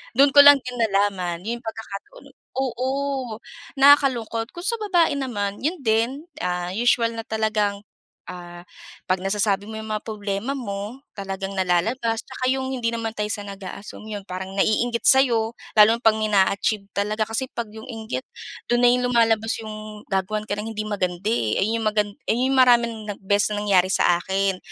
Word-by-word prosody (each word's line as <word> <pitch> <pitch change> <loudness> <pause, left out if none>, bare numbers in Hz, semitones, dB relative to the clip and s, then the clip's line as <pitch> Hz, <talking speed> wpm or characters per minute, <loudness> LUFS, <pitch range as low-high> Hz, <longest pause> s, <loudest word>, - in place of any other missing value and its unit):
Do'n 275 +2 +5
ko 285 - +7
lang 285 0 +10
din 250 -1 -6
nalaman, 195 -5 0
'yong 235 +1 -3
pagkakataon, 225 - -8 0.4
oo 255 0 -2 0.9
nakakalungkot. 260 -5 +4
Kung 345 - -7
sa 465 - +1
babae 350 -7 +2
naman, 205 -6 -3
'yon 320 +6 -1
din, 225 +1 +2 0.3
ah, 180 0 -2
usual 230 +1 +2
na 225 - -5
talagang, 215 -2 0 0.5
ah, 175 -1 -9 0.4
'pag 185 0 +1
nasasabi 200 +1 0
mo 220 - -6
'yong 220 0 -7
mga 215 -1 -2
problema 210 +3 -3
mo, 205 +1 -5 0.2
talagang 195 -1 -5
nalalabas. 220 +6 0
'Tsaka 255 -1 -2
'yong 265 0 -1
hindi 235 -3 -1
naman 230 -1 -3
tayo 210 -1 -3
sa 205 -1 -4
nag-aassume, 200 +2 -9
'yon 205 -1 -6
parang 190 0 -6
naiinggit 235 +3 +1
sa'yo, 235 -4 +4 0.2
lalo 210 0 +9
na - - -19
'pag 220 -2 +4
may 215 -1 -1
naa-achieve 200 +1 +2
talaga. 210 +2 -1
Kasi 230 +4 -1
'pag 230 -3 -4
'yong 220 +1 -11
inggit, 225 +1 -5 0.4
do'n 240 0 +2
na 245 - +6
'yon 250 0 +2
lumalabas 225 -1 +3
'yong 215 -1 -9
gagawan 195 +2 -1
ka 205 - -1
ng 220 +2 -5
hindi 215 - -3
maganda, 190 0 -2
eh, 115 - 0
ayun 220 +3 +1
'yong - - -3
magan 210 -1 +1 0.2
ayun 240 +3 +1
'yong 270 - +1
maraming 240 -2 +5 0.3
beses 205 +2 +1
na 205 - -2
nangyari 190 -2 +3
sa 175 -1 +3
akin. 190 +1 -1
215 Hz, 175 wpm, -23 LUFS, 200-235 Hz, 0.9 s, lang